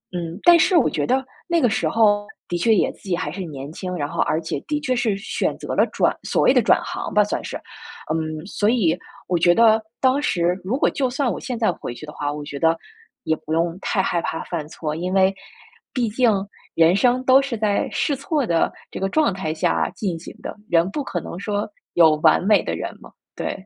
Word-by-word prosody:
嗯， 170 +1 -4
但 345 -1 +8
是 360 +2 +4
我 295 - +4
觉 - - -2
得 265 +2 +2 0.2
那 340 -1 +2
个 250 - +4
时 220 +1 0
候 205 -2 +3 0.2
的 175 - -2
确 225 +5 +4
也 - - +2
自 - - -22
己 175 - +2
还 - - -3
是 195 - -6
年 145 -3 -7
轻， 185 +1 -5
然 145 -3 -2
后 170 +1 -7
而 155 - +1
且 160 - -3
的 295 0 -1
确 255 -3 0
是 225 -5 0
选 200 - -2
择 - - -5
了 - - +5
转 - - +1
所 - - +1
谓 - - +5
的 - - +4
转 - - +4
行 - - -5
吧， 210 0 +5
算 205 - -3
是。 - - -5 0.6
嗯， 155 0 -3
所 205 +1 0
以 185 -9 +2 0.3
我 180 - 0
觉 175 +1 +4
得， 225 -1 +5 0.2
当 265 +2 +3
时 175 -7 +1
如 215 +8 -1
果 - - +3
就 260 -3 -1
算 260 -1 0
我 - - -4
现 250 -3 -4
在 220 -5 +2
回 160 - -7
去 155 - -9
的 150 - -10
话， 145 0 -3
我 150 0 -6
觉 145 -1 -6
得 165 0 +3 0.5
也 160 - +1
不 155 - -4
用 165 +1 0
太 195 - 0
害 170 -2 0
怕 160 - -3
犯 160 -4 -4
错， 155 -2 -4
因 180 +3 -3
为 190 0 +4 0.6
毕 245 -4 0
竟 235 +1 +3 0.4
人 165 +2 +5
生 250 +4 +2
都 265 +1 +6
是 270 -4 -3
在 210 -2 0
试 285 - 0
错 285 0 -1
的 165 -4 +1 0.2
这 - - -6
个 195 0 -1
状 305 -5 +2
态 185 -5 -3
下 80 - 0
进 185 -6 -3
行 - - -10
的， - - -5
人 170 +1 +3
不 290 - -3
可 180 -9 -3
能 170 - -7
说 205 +1 -2 0.3
有 160 -3 +6
完 155 +3 +4
美 210 +1 +4
的 - - -2
人 - - -5
嘛， - - -14 0.2
对。 190 - -5
195 Hz, 255 characters per minute, -22 LUFS, 165-240 Hz, 0.6 s, 但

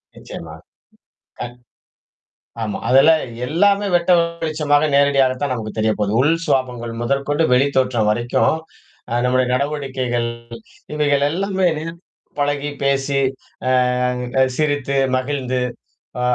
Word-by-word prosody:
நிச்சயமா, 80 -1 -9 0.9
கண் 120 0 -6 1.1
ஆமா. 105 - -3
அதுலாம் 155 +5 +6 0.3
எல்லாமே 200 +5 +2
வெட்ட 175 +1 +2 0.3
வெளிச்சமாக, 155 -1 +1
நேரடியாகத்தான் 140 -1 +2
நமக்குத் 110 -2 -6
தெரியப்போது. 110 -2 0
உள் 155 +4 +3
சுவாபாங்கள் 125 -3 -1
முதற்கொண்டு, 140 +5 0
வெளித்தோற்றம் 130 -4 +2
வரைக்கும் 120 +3 +1 0.6
அ - - -1
நம்முடைய 125 0 +2
நடவடிக்கைகள் 130 -4 -1 0.7
இவைகள் 145 -2 +2
எல்லாமே 190 +2 0 0.7
பழகிப் 145 0 -1
பேசி, 140 0 +1 0.5
அ - - +3 0.9
சிரித்து, 145 -3 0 0.2
மகிழ்ந்து, 130 -1 -1 0.6
அ, - - -1
140 Hz, 95 wpm, -20 LUFS, 125-145 Hz, 1.1 s, அதுலாம்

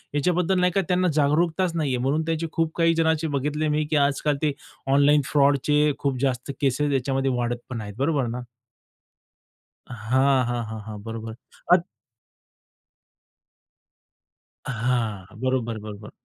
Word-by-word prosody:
याच्याबद्दल 180 +4 +1
नाही 180 0 +3
का 195 - +4
त्यांना 180 0 +2
जागरूकताच 160 +4 +2
नाहीये. 145 -6 0
म्हणून 135 +5 0
त्याचे 165 0 -1
खूप 165 -1 0
काही 165 0 +4
जणांचे 160 -1 +1
बघितले 150 +3 -1
मी 150 +1 +1
की 155 - 0
आजकाल 145 +1 0
ते 150 -2 +1 0.4
ऑनलाईन 145 +1 +5
फ्रॉडचे 145 +1 +3
खूप 135 -3 -1
जास्त 130 0 -1
केसेस 140 +2 +1
याच्यामध्ये 135 0 0
वाढत 120 0 -1
पण 115 -3 -4
आहेत, 105 -1 -7
बरोबर 140 -2 +1
ना? 125 +2 -4 1.5
हां, 130 +4 +2
हां, 120 -1 -2
हां, 110 -1 -6
हां. 105 -2 -7
बरोबर 115 0 -6 0.4
अत 175 -1 +5 2.8
हां. 115 -5 -1
बरोबर, 125 -3 -1
बरोबर. 105 0 -9
140 Hz, 135 wpm, -24 LUFS, 120-155 Hz, 2.8 s, ऑनलाईन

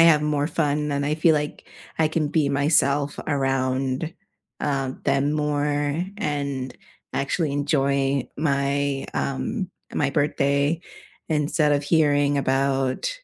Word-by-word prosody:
have 165 -3 +6
more 150 -1 +1
fun 150 -2 0
than 140 -1 -1
I 150 +1 +1
feel 160 0 +4
like 150 0 -3 0.3
I 160 -1 +3
can 155 -1 0
be 150 -2 +2
myself 140 0 +2
around, 135 +1 0 0.5
uh, 135 -2 -1
them 140 +2 +2
more 150 -1 0 0.5
and 140 -7 -3 0.4
actually 140 +2 0
enjoy 140 -2 +1
my, 140 -1 0
um 190 - -2 0.2
my 145 - +1
birthday, 145 +1 +1 0.5
instead 150 0 +2
of 145 0 +1
hearing 145 -3 +3
about 135 - 0
145 Hz, 120 wpm, -24 LUFS, 140-150 Hz, 0.5 s, have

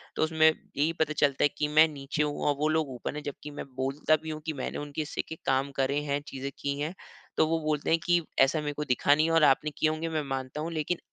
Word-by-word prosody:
तो - - +1
उसमें 160 0 +4
यही 155 0 -2
पता 155 -1 +1
चलता 145 -2 +2
है - - +7
कि 150 - +1
मैं 155 +1 +7
नीचे 145 0 -2
हूँ 145 -1 -2
और 145 - +3
वो 155 - +2
लोग 155 -2 +1
ऊपर 125 +4 -5
है 150 - -4
जबकी 145 +1 -7
मैं 145 - -6
बोलता 135 +4 +1
भी 160 - -5
हूँ 155 0 -4
की 160 - -2
मैंने 135 - -4
उनके 145 +1 -4
हिस्से 150 - -3
के 160 - -5
काम 135 +1 +1
करे 140 +2 +1
हैं 140 -1 -1
चीज़े 135 +1 -5
की 140 0 -2
हैं 155 +4 -2 0.4
तो 160 - +4
वो 165 +1 +1
बोलते 150 -2 0
हैं 165 - +4
कि, 175 -1 +4 0.2
"ऐसा 135 +4 +4
मेरे 145 -1 -3
को 150 - -3
दिखा 130 +2 +3
नहीं 155 - +3
है 165 - 0
और 165 -2 +5
आपने 145 +2 +4
किए 155 - +3
होंगे 160 +1 -2
मैं 155 -2 -1
मानता 135 +2 -3
हूँ 165 +2 -3
लेकिन 160 +3 -1
150 Hz, 270 wpm, -28 LUFS, 140-155 Hz, 0.4 s, है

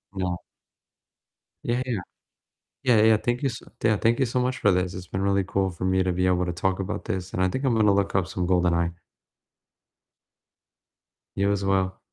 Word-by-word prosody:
No. 90 -2 -1 1.3
Yeah, 120 +1 +1
yeah, 125 - -3
yeah. 95 - -2 0.8
Yeah, 120 -5 +4
yeah, 110 -1 +6
thank 120 +5 -2
you 135 - +2
s 115 - -7 0.2
yeah, 110 -2 +4
thank 115 +1 +2
you 135 - +2
so 125 +2 -1
much 125 +1 0
for 105 -3 +3
this; 90 0 0
it's 90 -1 -7
been 95 - -4
really 100 -1 +2
cool 95 0 0
for 90 +1 -6
me 95 0 +2
to 90 -1 0
be 90 +1 0
able 90 0 +2
to 90 - -2
talk 95 +2 -1
about 100 +2 -4
this, 95 0 -4
and 95 - -1
I 95 - +3
think 130 +8 -3
I'm 125 -3 +2
gonna 105 -2 +4
look 100 -1 0
up 95 -2 +2
some 90 -1 -3
"GoldenEye." 85 -2 +2 2.4
You 100 +1 +1
as 100 -1 -1
well. 95 -1 +1
95 Hz, 205 wpm, -25 LUFS, 90-110 Hz, 2.4 s, yeah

